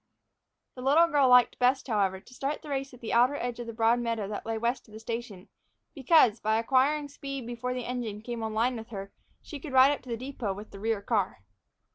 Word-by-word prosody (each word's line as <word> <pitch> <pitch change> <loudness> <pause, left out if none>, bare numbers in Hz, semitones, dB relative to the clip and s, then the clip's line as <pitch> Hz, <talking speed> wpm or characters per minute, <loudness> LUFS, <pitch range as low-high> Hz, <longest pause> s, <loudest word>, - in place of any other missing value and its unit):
The 250 - -9
little 290 +6 +5
girl 290 -5 +3
liked 250 -1 +5
best, 255 +3 +2
however, 195 -5 0
to 245 - -18
start 275 +3 -3
the 305 - -9
race 275 -1 -3
at 250 - -15
the 230 - -4
outer 245 +4 +4
edge 245 -3 -4
of 240 - -6
the 230 - -6
broad 225 +1 +3
meadow 230 -4 -2
that 210 +1 -6
lay 225 0 -1
west 240 +3 -2
of 215 - -14
the - - -8
station, 225 -4 -6 0.5
because, 270 - +4
by 220 +1 +1
acquiring 270 +5 +2
speed 275 -2 -7
before 240 +1 -4
the 250 -2 -4
engine 230 -4 -4
came 235 -1 -5
on 220 0 -3
a - - -7
line 240 +3 +1
with 225 0 -8
her, 195 -3 -7 0.3
she 295 - -8
could 280 -1 -8
ride 260 +2 +7
up 290 - -3
to 250 - -14
the 230 - -2
depot 250 -5 -4
with 205 +3 -10
the 195 - -10
rear 220 -1 -1
car. 200 - -1
240 Hz, 240 wpm, -28 LUFS, 220-265 Hz, 0.5 s, ride